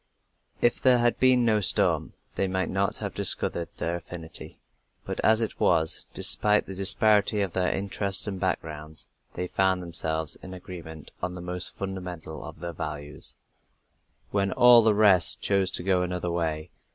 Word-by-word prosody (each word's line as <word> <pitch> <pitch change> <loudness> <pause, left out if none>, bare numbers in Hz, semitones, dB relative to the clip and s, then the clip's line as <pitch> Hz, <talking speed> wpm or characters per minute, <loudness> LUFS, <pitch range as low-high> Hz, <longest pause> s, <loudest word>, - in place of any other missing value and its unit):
If 120 - +1
there 130 -2 +5
had 120 0 +1
been 130 -2 +4
no 110 -2 +2
storm, 90 -6 +2 0.2
they 95 - -1
might 95 0 -2
not 100 +2 -1
have 100 -2 -5
discovered 85 -3 0
their 85 +1 -2
affinity, 85 -1 -7 0.5
but - - -5
as 110 +1 +3
it 110 - -4
was, 80 -2 +1
despite 105 0 +3
the 95 - -8
disparity 105 +2 +3
of 95 -4 -3
their 90 -1 0
interests 100 0 0
and 100 -3 -4
backgrounds, 80 -4 -4 0.3
they 90 - -3
found 95 0 0
themselves 80 -2 -1
in 95 0 -10
agreement 80 -4 -10
on 90 0 -4
the - - -8
most 90 0 -4
fundamental 90 -6 -7
of - - -11
their 85 -1 -5
values, 75 -2 -7 1.0
when 100 -1 0
all 120 -1 +7
the 110 -2 +2
rest 100 -6 +4
chose 100 -2 +1
to - - -3
go 95 -1 +1
another 90 -1 -3
way. 80 -1 -3
95 Hz, 165 wpm, -26 LUFS, 85-100 Hz, 1.0 s, all